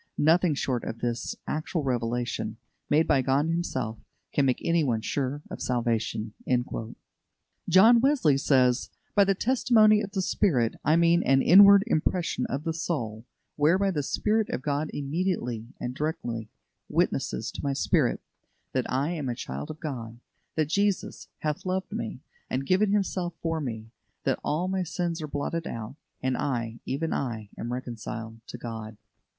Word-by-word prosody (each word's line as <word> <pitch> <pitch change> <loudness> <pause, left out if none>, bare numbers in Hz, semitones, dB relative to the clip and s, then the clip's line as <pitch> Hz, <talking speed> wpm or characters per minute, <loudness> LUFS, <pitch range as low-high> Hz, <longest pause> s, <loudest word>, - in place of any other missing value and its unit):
Nothing 165 +1 +4
short 130 -3 -1
of 115 - -4
this 120 0 -2
actual 155 +1 -2
revelation, 120 -3 -2 0.3
made 155 +2 +4
by 140 -3 +3
God 135 +3 +2
Himself, 130 -10 -2 0.3
can 140 -2 +3
make 130 - +1
anyone 145 -10 +2
sure 140 +4 -2
of - - -6
salvation." 115 -3 -1 1.4
John 225 +6 +7
Wesley 260 - +4
says: 130 -2 +3 0.2
"By 200 -1 +5
the 195 0 +2
testimony 220 -2 +4
of 200 -2 -6
the 190 - 0
Spirit, 125 - +2
I 155 - +4
mean 170 +1 +4
an 135 0 +3
inward 200 +2 +9
impression 175 -3 0
of 135 +3 -3
the 165 -1 -1
soul, 120 -9 -3 0.3
whereby 185 +7 +3
the 150 -5 -1
Spirit 215 +9 0
of 130 - -3
God 145 +1 -1
immediately 140 - -2
and 125 - -3
directly 125 -7 -3 0.4
witnesses - - 0
to - - -7
my 140 -1 0
spirit - - +1 0.5
that 130 -2 -1
I 140 +5 +1
am 150 -7 -3
a 120 - -2
child 70 - -6
of 155 - -7
God; 120 -7 -5 0.4
that 155 - +2
'Jesus 200 +1 0
hath 150 -1 -2
loved 185 0 -2
me, 115 +3 -4 0.3
and 135 +1 -1
given 195 +6 +3
Himself 185 -4 0
for 165 -1 -1
me'; 110 -4 -5 0.3
that - - 0
all 165 +5 0
my 190 0 0
sins 175 -1 -2
are 155 - -4
blotted 155 +3 -3
out, 115 +3 -6 0.3
and 130 -1 +1
I, 120 -5 -2
even 160 +5 -1
I, 110 -6 -3
am 120 - -5
reconciled 115 -2 -6
to - - -7
God." 110 -2 -7
145 Hz, 155 wpm, -27 LUFS, 120-175 Hz, 1.4 s, inward